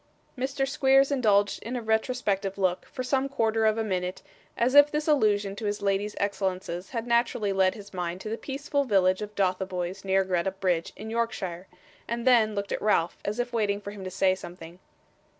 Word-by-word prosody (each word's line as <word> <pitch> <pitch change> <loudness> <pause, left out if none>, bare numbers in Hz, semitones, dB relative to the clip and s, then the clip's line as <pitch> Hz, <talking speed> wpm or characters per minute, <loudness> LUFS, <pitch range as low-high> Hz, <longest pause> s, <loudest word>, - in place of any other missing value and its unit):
Mr. 270 +1 -1
Squeers 270 -1 +4
indulged 205 -7 +2
in 235 +3 -5
a 245 - -2
retrospective 220 -3 0
look, 185 -2 0
for 255 - -5
some 270 +1 0
quarter 225 -4 +1
of 215 0 +2
a 225 - 0
minute, 185 -3 -3 0.3
as 245 +2 +2
if 290 +1 +8
this 300 +1 -2
allusion 210 -9 +2
to 215 +1 -6
his 205 0 -2
lady's 200 +1 0
excellences 190 -2 -2
had 230 -1 -4
naturally 235 -4 +1
led 190 0 +2
his 205 -2 -12
mind 175 -1 -3
to 215 - -8
the 220 - -2
peaceful 280 +3 -2
village 190 -5 +2
of 210 0 -6
Dotheboys 185 -1 -1
near 195 0 +2
Greta 185 -1 0
Bridge 185 -3 -1
in 220 +1 -8
Yorkshire; 195 -6 -3 0.4
and 235 +1 -3
then 225 -4 +4
looked 200 0 -3
at - - -2
Ralph, 185 -5 +1
as 205 +2 -3
if 245 0 -2
waiting 205 -3 0
for 205 0 -7
him 205 -2 -9
to 185 - -4
say 190 0 +2
something. 175 -1 -10
205 Hz, 195 wpm, -27 LUFS, 190-235 Hz, 0.4 s, if